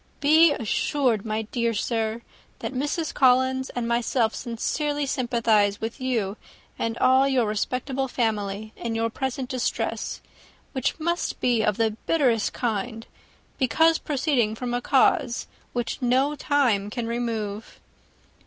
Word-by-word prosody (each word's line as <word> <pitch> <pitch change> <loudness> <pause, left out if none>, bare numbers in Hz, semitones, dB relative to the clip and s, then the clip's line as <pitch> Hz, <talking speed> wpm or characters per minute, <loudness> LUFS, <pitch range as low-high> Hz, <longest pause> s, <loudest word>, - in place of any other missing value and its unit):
Be 310 +2 +6
assured, 235 -2 0
my 215 +1 -1
dear 230 +1 -1
sir, 225 +1 -1 0.3
that - - -5
Mrs. 295 +5 -2
Collins 260 0 +3
and 240 -1 -1
myself 235 -1 +1
sincerely 290 +5 -2
sympathize 230 -6 +1
with 225 +4 -5
you, 225 -6 -1 0.4
and 230 0 -1
all 260 +1 +4
your 260 -4 +2
respectable 255 +5 -2
family, 215 -3 -2
in 230 -1 -4
your 225 0 0
present 265 +1 -3
distress, 255 -2 -2 0.5
which 260 +2 -1
must 340 +2 -1
be 240 -3 +2
of 210 -2 +1
the 225 -1 +2 0.2
bitterest 250 -9 +2
kind, 225 0 -3 0.5
because 320 +5 +3
proceeding 265 -7 0
from 245 +1 -4
a 245 - 0
cause 265 -1 +2 0.3
which 240 +1 -3
no 260 +4 +2
time 265 -9 +1
can 235 +2 -3
remove. 225 -3 -4
240 Hz, 130 wpm, -25 LUFS, 225-265 Hz, 0.5 s, Be